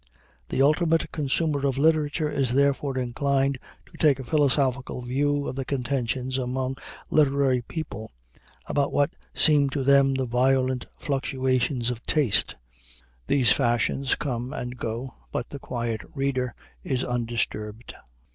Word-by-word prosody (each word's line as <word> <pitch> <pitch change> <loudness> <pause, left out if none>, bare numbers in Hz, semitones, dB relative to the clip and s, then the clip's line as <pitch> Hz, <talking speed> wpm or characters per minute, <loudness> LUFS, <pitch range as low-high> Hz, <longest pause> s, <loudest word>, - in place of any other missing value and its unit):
The 135 - +2
ultimate 160 +3 +2
consumer 145 -1 0
of 135 -1 -1
literature 155 +1 +2
is 130 -3 0
therefore 140 -1 +2
inclined 135 +2 0 0.3
to - - -17
take 145 -4 +4
a 135 - -6
philosophical 135 -2 +1
view 145 +3 0
of 125 - -4
the 135 - -2
contentions 130 -1 -1
among 130 +1 -2 0.3
literary 140 -4 +3
people, 115 -5 -6 0.5
about 140 -1 0
what 145 +2 +2 0.2
seem 145 -3 +5
to 135 0 -2
them 140 0 +5
the 130 -1 0
violent 130 +1 +1
fluctuations 130 -2 0
of 120 -1 -7
taste. 145 -9 +2 0.7
These 130 -4 +4
fashions 125 +1 +1
come 125 -3 -3
and 125 -4 -5
go, 115 +1 -4 0.2
but - - -4
the 140 - -6
quiet 120 -4 -3
reader 130 -3 -1 0.3
is 130 0 -1
undisturbed. 115 -2 -3
135 Hz, 130 wpm, -25 LUFS, 125-140 Hz, 0.7 s, seem